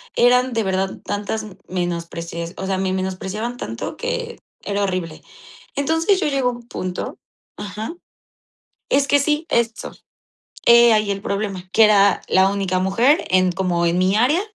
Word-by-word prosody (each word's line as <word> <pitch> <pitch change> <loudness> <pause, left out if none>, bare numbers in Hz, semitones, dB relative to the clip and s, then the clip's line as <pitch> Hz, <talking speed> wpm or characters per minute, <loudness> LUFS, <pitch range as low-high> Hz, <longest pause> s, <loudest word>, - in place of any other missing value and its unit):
eran 250 +1 +4
de 225 -1 0
verdad 190 0 -1
tantas 205 +2 -3
m 205 -4 -11
menosprecias 170 -1 -4
o 190 - -4
sea, 190 -1 -1
me 190 0 -1
menospreciaban 190 +5 -3
tanto - - -5
que 485 -1 -4 0.2
era 205 0 -1
horrible. 180 -5 -3 0.5
Entonces, 325 +7 +1
yo - - 0
llego 270 -3 +1
a - - -1
un 240 0 -12
punto 185 -5 -5 0.4
Ajá. 210 - -6 1.0
Es 275 0 +3
que 285 - +4
sí, 300 +3 0
eso. 225 -2 -1 0.7
He 235 0 +7
ahí 210 -1 +2
el 195 0 -2
problema, 195 -3 -3
que 225 - +5
era 200 -2 +4
la 190 +1 +4
única 195 -2 -1
mujer 230 - +2
en 185 0 +4
como 175 -2 0
en 170 +1 +1
mi 185 +1 +2
área, 275 +10 +3
200 Hz, 160 wpm, -21 LUFS, 185-245 Hz, 1.0 s, He